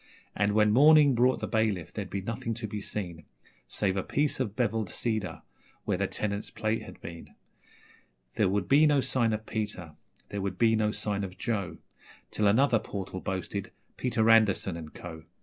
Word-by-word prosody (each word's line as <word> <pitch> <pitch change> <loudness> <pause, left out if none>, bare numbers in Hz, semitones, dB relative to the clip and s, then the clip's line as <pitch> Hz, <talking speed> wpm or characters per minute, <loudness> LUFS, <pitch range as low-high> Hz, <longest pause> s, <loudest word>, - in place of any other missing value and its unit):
And 105 0 +1
when 105 0 +4
morning 145 +2 +7
brought 125 +2 +3
the - - -2
bailiff 105 -7 0
there'd 100 -3 -5
be 100 - -3
nothing 115 +1 -3
to 115 0 -5
be 105 0 -5
seen 85 -7 -6 0.4
Save 95 -2 0
a 95 - 0
piece 145 +8 0
of 110 -6 -2
bevelled 110 -5 0
cedar 110 -5 -3 0.4
where - - 0
the - - +1
tenant's 105 -1 -3
plate 110 +1 -1
had - - -11
been; 85 -1 -10 1.0
There 105 -4 +2
would 100 -1 0
be 150 +3 +6
no 145 -2 +3
sign 130 -3 +1
of 110 0 -3
Peter 105 -8 -4 0.4
there 100 - -4
would 95 -1 -3
be 115 +1 +4
no 110 -1 +2
sign 100 -2 -2
of 95 -1 -6
Joe 100 -6 -2 0.5
Till 105 - +1
another 115 +3 +4
portal 95 -3 -6
boasted 95 +1 -4 0.2
'Peter 120 -3 0
Anderson 110 -5 +4
and 80 -2 -8
Co.' 80 -2 -9
105 Hz, 180 wpm, -29 LUFS, 95-115 Hz, 1.0 s, morning